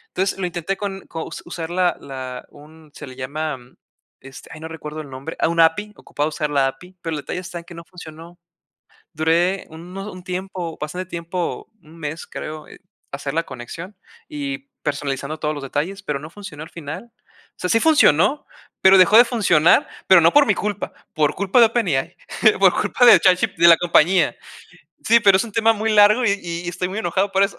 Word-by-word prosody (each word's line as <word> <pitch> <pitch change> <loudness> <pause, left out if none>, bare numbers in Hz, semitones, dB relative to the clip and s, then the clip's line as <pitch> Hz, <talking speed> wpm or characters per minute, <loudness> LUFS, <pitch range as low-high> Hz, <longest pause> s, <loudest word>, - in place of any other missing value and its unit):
Entonces, 190 +1 0
lo 190 - -2
intenté 175 +2 -3
con 195 -1 -6
co 165 -1 -6
u - - -9 0.2
usar 170 -1 -6
la 180 0 +1
la 130 -2 -7
un 155 +1 -17
se 150 - -10
le 130 - -11
llama, 145 +3 -4 0.6
este, 135 0 -13
ay, 160 - -10
no 160 - -7
recuerdo 155 -1 -8
el 150 -2 -8
nombre. 135 +4 -8
Ah, - - +2
una 165 0 +4
API. 210 +6 -2
Ocupaba 145 +1 -3
usar 150 -1 -3
la 140 -2 +2
API, 180 +8 -9
pero 165 -2 -3
el 150 - -4
detalle 180 - -5
está 180 -1 -7
en 170 - -12
que 175 - -13
no 170 0 -11
funcionó. 170 -1 -12 0.8
Duré 170 +4 +1
uno 180 +6 -9
un 185 - -11
tiempo, 180 -2 -5
bastante 180 +5 -5
tiempo, 170 0 -5
1 160 +1 -17
mes, 155 +1 -6
creo, 155 0 -8
en - - -14 0.3
hacer 140 0 -5
la 165 - +1
conexión 165 - -9 0.3
y 280 -2 -6
personalizando 145 +1 -3
todos 150 - -1
los 145 -2 -7
detalles, 160 +9 -3
pero 150 -5 -3
no 155 +2 -10
funcionó 170 -6 -10
al 160 - -10
final. 170 +9 -8 0.5
O - - -59
sea, 180 - -3
sí 225 - +3
funcionó, 290 - +3 0.3
pero 190 0 +7
dejó 195 +3 +6
de 240 - +9
funcionar, 195 -10 +3 0.2
pero 190 -2 +7
no 165 +1 +4
por 290 -1 +5
mi 210 - +3
culpa, 205 0 -4 0.2
por 150 -1 +1
culpa 200 +5 +1
de 230 - +8
OpenAI 200 - -1 0.4
por - - +6
culpa 245 - +1
de 240 - +9
ChatG 185 -1 +2
de 170 - +5
la 165 - +8
compañía. 175 +1 +3 0.7
Sí, 235 +1 +5
pero 200 -3 +5
es 190 - 0
un 225 - -10
tema 225 +1 +3
muy 220 0 -2
largo, 210 +4 +5
y 205 - +3
y 170 0 -5
estoy 180 +1 -3
muy 195 - -5
enojado 195 0 0
por 195 0 +3
eso 195 - -4
170 Hz, 205 wpm, -21 LUFS, 155-195 Hz, 0.8 s, de